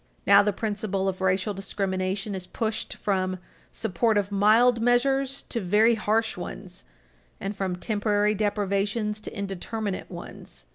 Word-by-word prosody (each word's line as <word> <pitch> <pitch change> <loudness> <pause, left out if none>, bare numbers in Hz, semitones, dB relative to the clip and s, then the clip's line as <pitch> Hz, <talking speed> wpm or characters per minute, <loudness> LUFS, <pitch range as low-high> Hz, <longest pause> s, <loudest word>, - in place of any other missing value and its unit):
Now 200 +1 +8
the 205 +1 +1
principle 200 -2 -2
of 190 -1 -2
racial 190 +2 +1
discrimination 195 +1 -2
is 185 -2 -5
pushed 220 -2 -3
from 185 -2 -1 0.3
support 220 +1 0
of 200 0 0
mild 225 +4 +4
measures 270 +3 +2
to 230 - -2
very 210 +5 +4
harsh 225 +1 0
ones, 180 +1 -8 0.5
and 200 +1 -4
from 190 -2 -2
temporary 210 +1 +1
deprivations 210 +1 -1
to 215 - -8
indeterminate 200 +1 -4
ones. - - -10
205 Hz, 135 wpm, -26 LUFS, 195-220 Hz, 0.5 s, Now